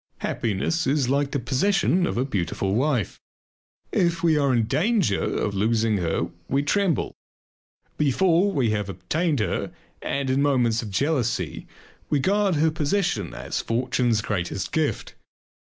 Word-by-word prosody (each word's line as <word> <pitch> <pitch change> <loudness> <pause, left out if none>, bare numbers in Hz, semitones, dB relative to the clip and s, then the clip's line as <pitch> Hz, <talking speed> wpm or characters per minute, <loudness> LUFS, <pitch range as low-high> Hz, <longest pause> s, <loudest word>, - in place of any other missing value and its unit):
Happiness 120 - -1
is 135 -2 +1
like 140 +1 +1
the 140 - -1
possession 175 - +1
of - - -3
a 125 - +1
beautiful 95 -4 -2
wife. 125 - 0 0.7
If 170 -2 +1
we 165 -2 +4
are 140 -2 +2
in 120 -3 +2
danger 155 - +1
of 100 - -1
losing 110 +1 +1
her 85 -2 -1 0.2
we 140 +2 +1
tremble. 195 +4 0 0.9
Before 170 +6 +3
we 130 - +1
have 105 -2 -2
obtained 145 - -1
her - - -2 0.3
and 140 -1 -1
in 135 +2 +2
moments 125 -5 +2
of 110 - -6
jealousy 130 +2 -1 0.4
we 145 - +2
guard 195 +4 +2
her 155 +2 +3
possession 160 +6 -1
as - - -3
fortune's 120 -1 0
greatest 95 -3 -3
gift. 155 -2 -1
135 Hz, 140 wpm, -24 LUFS, 110-160 Hz, 0.9 s, we